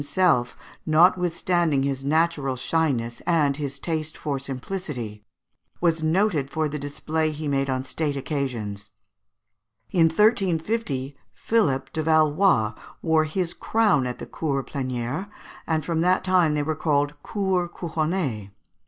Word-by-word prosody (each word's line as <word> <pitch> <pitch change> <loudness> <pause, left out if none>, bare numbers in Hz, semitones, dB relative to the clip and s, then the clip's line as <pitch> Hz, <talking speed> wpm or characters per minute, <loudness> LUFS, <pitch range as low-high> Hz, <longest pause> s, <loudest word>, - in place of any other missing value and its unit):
himself, 145 -5 +1 0.3
notwithstanding 170 -2 +3
his 135 -1 -2
natural 150 -2 +1
shyness 130 -4 -1
and 150 -5 +2
his 140 -2 -4
taste 160 -2 -3
for 140 -3 -2
simplicity, 130 - -5 0.6
was 165 -2 +1
noted 160 -3 +1
for 155 +2 0
the 150 0 -4
display 155 +3 -1
he 155 0 -5
made 135 -1 0
on 130 0 -1
state 145 +1 -2
occasions. 115 -8 -3 1.0
In 170 -3 +4
1350, 175 - +1 0.2
Philippe 135 -12 +1
de 160 - -1
Valois 155 - +3 0.3
wore 160 -1 +3
his 175 +2 -2
crown 205 - +2
at 125 - -4
the - - -7
Cours 140 -4 -2
Plénières, 130 +6 -3 0.4
and 160 -2 0
from 165 -2 0
that 180 +2 +3
time 180 -5 +3
they 150 - 0
were 155 +1 -1
called 145 -2 +1
Cours 190 -4 -1
Couronnées. 155 - -2
155 Hz, 130 wpm, -24 LUFS, 135-170 Hz, 1.0 s, In